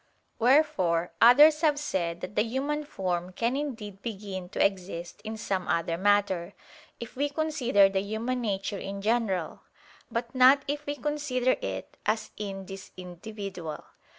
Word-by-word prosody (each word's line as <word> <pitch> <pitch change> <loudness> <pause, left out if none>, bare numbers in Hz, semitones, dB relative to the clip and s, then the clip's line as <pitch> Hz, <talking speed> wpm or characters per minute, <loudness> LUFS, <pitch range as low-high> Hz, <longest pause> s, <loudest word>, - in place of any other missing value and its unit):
Wherefore 185 - +3
others 295 +6 +8
have 300 -3 +3
said 175 -12 -2
that 185 - -6
the - - +4
human 275 +6 -2
form 180 -7 -3
can 235 +6 0
indeed 225 -9 -5
begin 195 -5 -6
to - - +2
exist 185 -1 -3
in 220 0 -5
some 190 -4 -2
other 165 0 0
matter, 195 -2 +1 0.4
if 235 - -8
we 285 +3 0
consider 280 -9 +3
the 195 0 0
human 225 +5 -2
nature 195 -2 -2
in 195 0 -6
general: 210 -7 0 0.5
but 235 0 -3
not 260 +2 +6
if 290 +1 -3
we 290 - -1
consider 275 -3 0
it 95 -1 -5
as 215 0 0
in 195 -2 -5
this 195 0 -9
individual. 180 -2 -7
210 Hz, 150 wpm, -28 LUFS, 190-255 Hz, 0.5 s, others